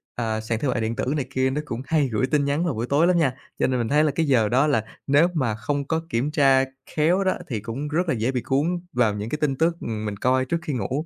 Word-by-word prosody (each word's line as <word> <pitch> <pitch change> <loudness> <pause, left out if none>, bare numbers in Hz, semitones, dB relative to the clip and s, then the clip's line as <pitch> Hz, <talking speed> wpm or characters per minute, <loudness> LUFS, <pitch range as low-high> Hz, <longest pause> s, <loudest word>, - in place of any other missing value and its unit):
à, 110 -2 -2
sàn 110 0 -2
thương 135 -2 0
mại 120 - -1
điện 110 +1 -1
tử - - -2
này 140 - -1
kia 130 0 +1
nó 140 +3 -2
cũng 120 -2 -5
hay 150 -2 +2
gửi 110 +4 +1
tin 145 0 +1
nhắn 145 +5 0
vào 165 - 0
buổi 115 +2 -2
tối 155 +5 +3
lắm 180 -1 +3
nha. 135 -6 +2 0.3
Cho - - +3
nên 130 -1 0
mình 115 - -1
thấy 150 +4 +3
là 150 - +2
cái 165 - +1
giờ 115 -6 +3
đó 135 +6 +3
là 140 -7 +2 0.2
nếu 145 +5 +5
mà 130 -9 0
không 140 +5 -3
có 160 0 0
kiểm 130 +6 -1
tra 135 -4 +4 0.3
khéo 170 +6 +3
đó, 185 - +2
thì 115 -5 -3
cũng 115 +8 -5
rất 165 +3 -1
là - - +3
dễ 120 +2 0
bị 125 - -2
cuốn 140 +6 0 0.3
vào 120 -4 +2
những 105 +2 -4
cái 150 - -2
tin 145 -3 +1
tức, 165 +4 +1
ừm, 110 -1 -4
mình 100 -1 -4
coi 130 +3 +2
trước 170 +6 -1
khi 155 -4 -4
ngủ, 130 +7 -2
135 Hz, 295 wpm, -24 LUFS, 115-150 Hz, 0.3 s, nếu